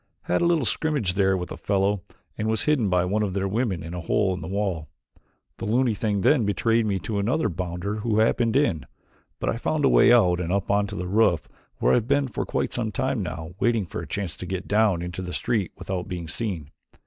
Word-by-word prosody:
Had 90 - 0
a 170 - +3
little 165 -6 +2
scrimmage 140 - 0
there 95 0 +2
with 90 -1 -5
a - - -5
fellow 100 0 +1 0.3
and 105 - -2
was 110 -1 +1
hidden 140 -9 +2
by 90 -1 +2
one 105 +4 0
of 100 -3 -1
their 100 0 0
women 100 -4 -1
in 85 +1 -7
a 90 - -4
hole 95 +3 +1
in 90 - -5
the 80 - -6
wall. 95 -6 -2 0.7
The - - -5
loony 120 +2 +2
thing 105 -1 -1
then 135 +3 +4
betrayed 115 +2 +1
me 100 -2 +1
to 105 -3 -2
another 115 +5 +1
bounder 90 +3 -3
who 110 0 0
happened 115 +1 +2
in, 85 - +1 0.5
but - - -3
I - - 0
found 150 +4 0
a - - +5
way - - +6
out 90 -8 +5
and 90 -1 -2
up 100 +1 0
onto 100 0 +1
the 90 - -3
roof 95 -5 +2 0.3
where - - +2
I - - +5
have 115 -2 -1
been 140 0 +2
for 120 - -4
quite - - -1
some 115 -3 -2
time 125 +2 -1
now 85 -3 -5
waiting 115 -4 +2
for - - -5
a - - -8
chance 100 -5 -3
to 90 - -7
get 95 +1 -4
down 105 -5 +2
into 90 +1 -5
the 90 -1 -5
street 105 -6 -1
without 95 -2 -4
being 90 -4 -5
seen. 85 -5 -4
100 Hz, 235 wpm, -25 LUFS, 90-115 Hz, 0.7 s, way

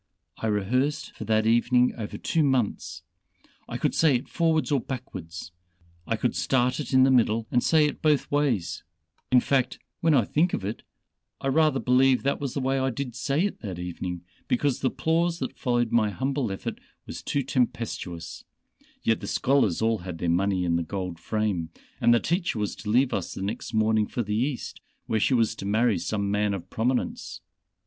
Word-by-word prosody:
I 110 - -2
rehearsed 125 +8 0
for 110 - -7
that 110 0 +2
evening 120 +2 +3
over 110 -3 -5
two 165 - 0
months 110 - 0 0.7
I - - -3
could - - 0
say 155 -5 +4
it 120 - -2
forwards 160 -6 +1
or 140 - +3
backwards, 90 -10 -7 0.6
I 115 - +1
could 115 +2 -1
start 125 0 +1
it 150 - -4
in 130 -1 +6
the 135 - +5
middle 115 -3 +3
and 125 - +3
say 155 +2 +4
it 150 - -3
both 150 -3 +2
ways 120 - 0 0.5
in 125 -1 +6
fact 130 -1 +1 0.2
when 160 -2 +3
I 120 -6 +4
think 170 - +1
of 95 - -5
it, 105 +3 -4 0.6
I 135 - -1
rather 150 -1 +3
believe 130 +1 +3
that 140 +1 0
was 140 -3 -3
the - - 0
way 135 0 0
I 130 0 +1
did 130 0 -4
say 140 +7 0
it 205 - -3
that 95 -6 -6
evening, 90 0 -5 0.2
because 140 +1 +1
the 135 - +1
applause 165 +4 0
that 130 - -4
followed 120 -2 +1
my 110 -3 +3
humble 130 +2 -1
effort 95 - -5 0.3
was - - -7
too 140 - -1
tempestuous, 90 -10 -3 0.6
yet 115 -1 +2
the - - -7
scholars 125 -9 +2
all 115 -1 +2
had 90 -1 -6
their 85 - -1
money 95 +1 +1
in 85 -1 +2
the - - 0
gold 90 0 -4
frame, 105 -7 -1 0.3
and - - +4
the 120 - +5
teacher 170 - -1
was 105 -2 -2
to 105 - -6
leave 125 +4 +3
us 95 -4 -3
next 100 +2 -4
morning 110 -1 +2
for 120 - -2
the 105 0 -3
East, 125 +4 -2 0.2
where 110 - 0
she 130 - +2
was 115 -3 +2
to - - -8
marry 110 +2 +2
some 100 -2 -2
man 105 0 +1
of 90 - -9
prominence. 125 +3 -2
120 Hz, 195 wpm, -26 LUFS, 100-135 Hz, 0.7 s, in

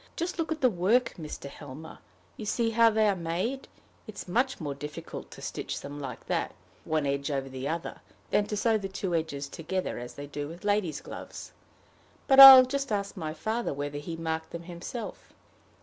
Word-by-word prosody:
Just 340 +1 -3
look 330 0 -1
at 320 - -2
the 255 - +5
work, 210 +7 +2
Mr. 150 -3 -7
Helmer. 145 +2 -10 0.4
You - - -8
see 225 +2 0
how 230 0 +5
they 220 -1 +2
are 200 - +2
made? 185 +10 -3 0.4
It 215 - -9
is - - -7
much 250 +8 0
more 145 -4 -3
difficult 150 +2 -8
to - - -12
stitch - - -4
them 145 +1 -8
like 130 -4 -7
that, - - -2 0.3
one 155 -2 0
edge 140 +1 -1
over 135 -2 -2
the 130 0 -5
other, 165 +2 -4 0.3
than 205 - +2
to 210 - -3
sew 220 +1 +2
the 195 - -4
two 190 -1 -3
edges 155 -4 -2
together, 175 +4 -4
as 120 0 -8
they 145 - -7
do 145 0 -5
with 170 +6 -10
ladies' 205 -6 0
gloves. - - -9 0.7
But 270 -1 +5
I'll 265 -1 +13
just 275 -1 -3
ask 200 -1 -2
my 160 -4 -5
father 220 -1 -2
whether 145 +1 -4
he 165 +3 -6
marked 160 -1 -3
them 170 0 -7
himself." 180 +6 -8
175 Hz, 195 wpm, -28 LUFS, 145-220 Hz, 0.7 s, I'll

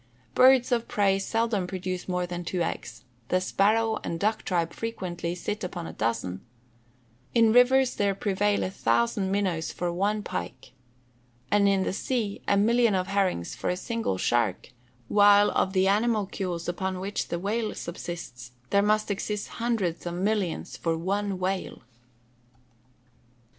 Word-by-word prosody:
Birds 255 -1 +5
of 235 -1 +1
prey 195 -2 +2
seldom 225 -2 0
produce 185 -1 -4
more 180 0 0
than 175 0 -5
two 175 0 -1
eggs; 165 - -5 0.2
the 185 - +2
sparrow 220 +4 +2
and 165 - -3
duck 215 +3 +1
tribe 170 -3 -1
frequently 180 -6 -4
sit 205 +4 -4
upon 175 -2 -5
a - - -7
dozen; 100 -5 -2 0.9
in 225 -2 +5
rivers 255 +1 +5
there 200 -1 +1
prevail 200 +1 +1
a 185 - -2
thousand 120 - +1
minnows 185 -5 0
for 175 -1 -3
one 205 +4 0
pike; 130 -8 -6 0.8
and 205 -1 +4
in 195 -1 +2
the - - -2
sea, 215 -1 -2
a 200 - +3
million 230 +1 +3
of 185 -1 0
herrings 195 - 0
for - - -3
a 180 - 0
single 230 - -2
shark; 115 -3 0 0.4
while 205 +2 +6
of 190 - +1
the 190 0 +2
animalcules 200 -5 0
upon 185 +1 -2
which 200 +2 -3
the 170 - -2
whale 215 +4 -2
subsists, 165 -8 -7 0.2
there 200 - +4
must 215 +1 +1
exist 205 +1 -3
hundreds 205 -8 -1
of 175 - -3
millions 195 -2 -1
for 165 -1 -1
one 195 +3 -1
whale. 185 -5 -3
195 Hz, 150 wpm, -27 LUFS, 175-210 Hz, 0.9 s, while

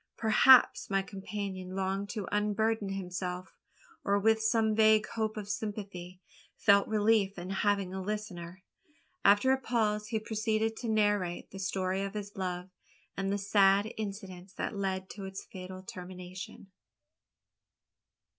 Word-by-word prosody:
Perhaps 240 +4 +6
my 195 -1 +1
companion 195 -2 -6
longed 195 +1 -2
to 205 -4 -4
unburden 210 0 0
himself; 180 -1 -4 0.5
or, 200 0 +2
with 220 +2 +3
some 220 0 +2
vague 215 0 +5
hope 220 -1 -2
of 205 -2 -5
sympathy, 200 -4 -5 0.4
felt 200 -1 +5
relief 210 -2 +2
in 180 +2 -6
having 195 -1 0
a 190 - -3
listener. 190 -3 -5 0.6
After 205 +6 +5
a 265 0 +1
pause 215 -3 0
he 225 -1 -1
proceeded 220 0 -1
to 235 - -4
narrate 205 -5 +1
the 195 - -8
story 190 0 -1
of 195 +1 -4
his 205 -1 -6
love, 180 -1 -4 0.4
and 195 0 -1
the 200 - +1
sad 200 +1 +3
incidents 195 -3 -7
that 210 - -4
led 190 -1 -2
to 200 -2 -7
its 190 0 -7
fatal 185 0 -9
termination. 185 -1 -9
200 Hz, 135 wpm, -31 LUFS, 190-215 Hz, 0.6 s, Perhaps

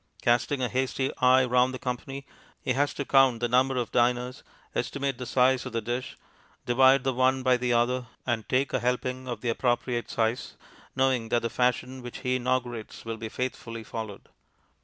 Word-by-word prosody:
Casting 120 +3 +2
a - - +2
hasty 130 +1 -1
eye 130 +1 +5
round 125 +1 +2
the - - -4
company, 135 +2 -5 0.4
he 130 - +1
has 140 +2 +1
to 140 - -3
count 135 -4 +4
the 120 - 0
number 130 +2 +2
of 120 -2 -2
diners, 125 +1 +1 0.3
estimate 140 -2 -2
the 125 - -5
size 130 0 +3
of - - -7
the 115 - 0
dish, 120 +3 -4 0.5
divide 130 +2 +5
the 135 -1 0
one 130 +1 +2
by 130 -1 +4
the 125 0 -1
other, 125 +1 +1 0.2
and 120 -3 -2
take 130 +2 +1
a - - +2
helping 125 +1 -2
of 120 -3 -4
the 120 - -1
appropriate 120 0 0
size, 115 +1 -1 0.4
knowing 130 -3 +1
that 120 0 +1
the 115 - -2
fashion 125 +1 0
which 120 -1 -8
he 130 -1 +1
inaugurates 120 -3 -3
will 115 0 -4
be 110 0 -6
faithfully 115 -2 -4
followed. 110 -2 -7
125 Hz, 185 wpm, -27 LUFS, 120-130 Hz, 0.5 s, eye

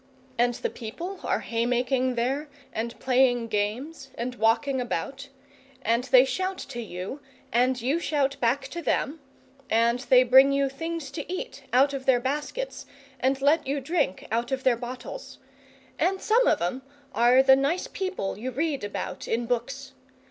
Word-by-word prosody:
And 245 0 +2
the - - -3
people 340 - -7
are - - 0
haymaking 250 +2 0
there, 270 +6 -1 0.2
and 230 +1 -4
playing 250 -2 +2
games, 240 +8 -3
and 245 +2 -3
walking 250 +3 +1
about; 265 +5 -4 0.6
and 235 +2 +1
they 255 0 +6
shout 370 +7 -2
to 240 - -6
you, 195 +5 -6 0.3
and 250 +2 +3
you 270 +8 0
shout 280 -4 0
back 270 +3 +1
to 345 - -5
them, 310 -1 -1 0.5
and 235 +2 +3
they 255 0 +5
bring 265 +2 +7
you 275 0 +1
things 325 0 -5
to 300 +4 -6
eat 485 +7 -6
out 275 +3 +4
of 265 -1 -5
their 255 -2 +5
baskets, 295 - -4 0.3
and 265 +2 0
let 295 0 +3
you 280 +1 0
drink 280 - -1
out 235 +2 -1
of 265 0 -2
their 255 -2 +4
bottles; 250 - -8 0.6
and 385 +1 +1
some 475 +5 +3
of - - +3
'em 215 +10 -2 0.3
are 245 +2 +5
the 265 0 +7
nice 280 +7 0
people 375 - -4
you 250 +4 -3
read 280 +1 -2
about 205 - -5
in 235 +1 0
books. 265 +3 -3
265 Hz, 165 wpm, -26 LUFS, 240-285 Hz, 0.6 s, bring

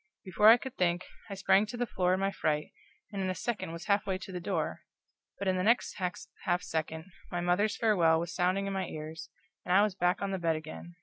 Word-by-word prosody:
Before 190 +3 +3
I 230 - +9
could 260 0 -8
think, 175 0 +1 0.2
I 200 - -4
sprang 195 +2 +3
to 240 - -6
the 245 - 0
floor 185 -4 +1
in - - -3
my 195 0 +1
fright, 150 -5 -1 0.4
and 200 -2 -3
in 190 - -1
a 185 - -1
second 225 -7 -3
was 170 0 -7
half 205 -1 +2
way 190 -1 0
to 190 - -9
the 180 - -4
door; 175 - -2 0.6
but 200 - -3
in 185 0 +2
the - - 0
next 230 +4 +2
half 180 0 -3
second 160 0 -3 0.3
my 175 - -1
mother's 180 +5 +1
farewell 170 -8 +4
was 170 +1 -4
sounding 185 +2 +1
in 195 - -2
my 190 -2 -2
ears, 155 0 -7 0.3
and - - -4
I 200 - +7
was 210 -2 +1
back 180 -1 +1
on 200 - -1
the 190 - -2
bed 165 -2 +1
again. 155 +2 -8
185 Hz, 240 wpm, -31 LUFS, 170-200 Hz, 0.6 s, I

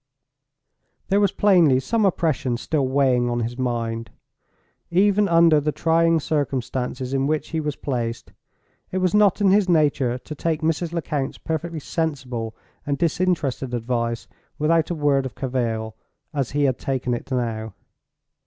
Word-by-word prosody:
There 200 +1 +3
was 200 -1 +3
plainly 175 -10 +4
some 215 - 0
oppression 155 -9 0
still 140 +1 -1
weighing 130 -2 +2
on 120 0 -1
his 115 +1 -3
mind. 115 -2 -2 0.8
Even 200 +3 +3
under 165 -3 +5
the 150 +1 0
trying 165 +1 +2
circumstances 130 -3 -2
in 135 0 +1
which 155 0 -1
he 160 - -2
was 150 -2 -2
placed 120 -4 -4 0.6
it 185 - -2
was 185 -2 +1
not 210 -1 +4
in 195 -2 +5
his 200 -1 +3
nature 145 -7 +2
to 130 +4 -9
take 160 +1 -2
Mrs. 165 +1 0
Lecount's 150 -5 -3
perfectly 160 +1 -3
sensible 130 -8 -3 0.3
and 145 -1 -1
disinterested 155 -6 0
advice 115 0 -2 0.3
without 160 +1 +2
a 175 - -1
word 140 -3 +1
of 120 - -12
cavil, 115 -4 -2 0.4
as 140 -4 -1
he 145 +1 0
had 130 -3 +1
taken 130 -2 -1
it 120 - -5
now. 110 -4 -2
140 Hz, 150 wpm, -23 LUFS, 125-165 Hz, 0.8 s, under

